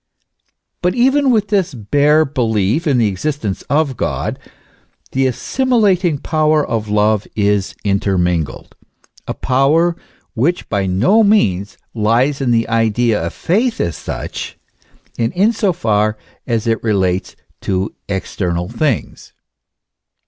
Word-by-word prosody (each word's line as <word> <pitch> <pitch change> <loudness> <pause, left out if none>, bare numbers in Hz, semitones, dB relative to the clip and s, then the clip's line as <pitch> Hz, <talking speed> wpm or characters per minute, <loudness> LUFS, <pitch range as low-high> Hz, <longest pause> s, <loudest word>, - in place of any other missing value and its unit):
f - - -45 0.3
But 180 +4 +1
even 270 +3 +3
with 215 -4 +2
this 190 -8 0
bare 145 +8 +3
belief 115 - 0
in 140 -4 +3
the 115 -3 +3
exist 115 +8 -3
ence 95 -2 -2
of 145 -3 +1
God, - - -2 0.7
the 135 0 +1
assimilating 195 - +1
power 155 0 +1
of 110 -2 -3
love 105 0 +1
is 100 -2 0
intermingled; 90 -5 -1 0.5
a - - -3
power 150 +7 +2 0.4
which 140 +9 0
by 100 -2 0
no 120 - +3
means 100 - +2 0.2
lies 120 +6 +1
in 130 - 0
the 115 -1 +2
idea 115 -2 +1
of 85 - -3
faith 225 +7 0
as 85 - -1
such, - - -6 0.6
and 115 -1 +1
in 205 +6 +3
so 205 -3 +1
far 110 -10 0 0.3
as 115 -3 -1
it 115 -1 0
relates 95 -4 0 0.3
to 95 +1 -2 0.2
external 90 -2 -2
things. 145 -8 -2
120 Hz, 130 wpm, -17 LUFS, 105-160 Hz, 0.7 s, even